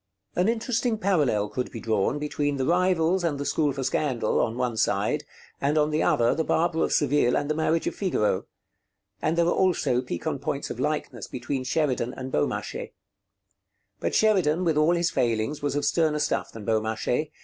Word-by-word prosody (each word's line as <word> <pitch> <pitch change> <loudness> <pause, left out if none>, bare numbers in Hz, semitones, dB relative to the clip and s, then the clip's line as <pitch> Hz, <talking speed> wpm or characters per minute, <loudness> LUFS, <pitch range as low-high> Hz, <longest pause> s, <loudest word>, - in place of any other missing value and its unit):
An 180 +4 +2
interesting 230 0 0
parallel 150 - +1
could 125 - -3
be 115 - -6
drawn 110 +4 0
between 145 -1 -1
'The 130 - 0
Rivals' 180 +1 +2
and 150 -4 -1
the 145 - -3
'School 150 -1 +1
for 135 0 -4
Scandal' 125 -5 0
on 110 - 0
the - - -8
one 125 -2 -1
side, - - 0 0.4
and 145 +3 +1
on 150 0 +2
the 155 +1 +1
other 120 0 +3
'The 160 - 0
Barber 165 +1 +1
of - - -1
Seville' 145 -4 +3
and - - -1
'The - - +2
Marriage 160 +1 0
of - - -1
Figaro'; 105 - 0 0.7
and 160 +2 0
there 170 - +4
are 175 - +2
also 175 -9 +2
piquant 125 +3 -4
points 140 0 -3
of 120 - -6
likeness 135 -5 -2
between 130 +2 -4
Sheridan 130 -4 0
and 130 0 -6
Beaumarchais. 75 - -2 1.1
But - - -1
Sheridan, 185 -6 +3
with 165 -3 +2
all 155 +3 +3
his 170 +1 +1
failings, 120 +2 0
was 145 0 -1
of 145 - 0
sterner 155 -3 +2
stuff 150 0 -1
than 110 -2 -9
Beaumarchais. 110 +6 0
145 Hz, 190 wpm, -26 LUFS, 125-165 Hz, 1.1 s, there